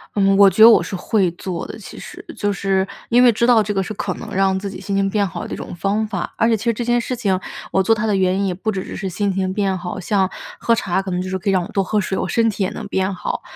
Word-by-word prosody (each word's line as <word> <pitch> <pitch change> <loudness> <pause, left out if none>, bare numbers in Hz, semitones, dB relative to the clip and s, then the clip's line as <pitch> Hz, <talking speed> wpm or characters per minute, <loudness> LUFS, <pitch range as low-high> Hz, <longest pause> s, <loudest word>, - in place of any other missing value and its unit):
嗯， 195 -1 +3
我 200 -1 +8
觉 215 - 0
得 230 - +11
我 - - +5
是 - - -8
会 185 -1 +1
做 175 0 -5
的， - - -8
其 - - -11
实， - - -10
就 205 -1 -1
是 195 -1 0 0.2
因 245 +1 +4
为 245 - +7
知 235 +2 +1
道 230 -3 +5
这 205 0 -2
个 195 - 0
是 205 +3 -4
可 190 -1 -3
能 - - -8
让 190 0 +2
自 200 0 -5
己 190 0 -9
心 200 +1 -4
情 195 0 +1
变 205 0 +1
好 185 - -5
的 - - -6
一 - - -2
种 - - -7
方 200 +5 -1
法。 215 - -4
而 230 - +2
且 225 - +3
其 220 - -8
实 235 - +2
这 240 - -3
件 240 0 +2
事 250 +2 -3
情， 195 -6 0 0.3
我 190 - +3
做 225 +4 +3
它 215 +1 -2
的 215 - +1
原 190 -1 +2
因 200 - 0
也 185 - -1
不 195 +5 -4
只 190 - -3
只 - - -7
是 190 - -4
心 200 +2 -1
情 190 0 -1
变 195 -2 0
好， 180 +1 -6
像 190 0 +1 0.3
喝 230 - +2
茶 190 -3 -1
可 190 -1 -6
能 180 0 -1
就 185 - -5
是 190 - -2
可 195 - -2
以 - - +3
让 185 -2 +2
我 - - -7
多 195 - +1
喝 210 +2 0
水， 190 -1 -2
我 - - -1
身 230 -1 +2
体 205 -1 -4
也 185 - 0
能 220 - -7
变 190 0 -1
好。 - - -4
195 Hz, 345 characters per minute, -20 LUFS, 190-215 Hz, 0.3 s, 得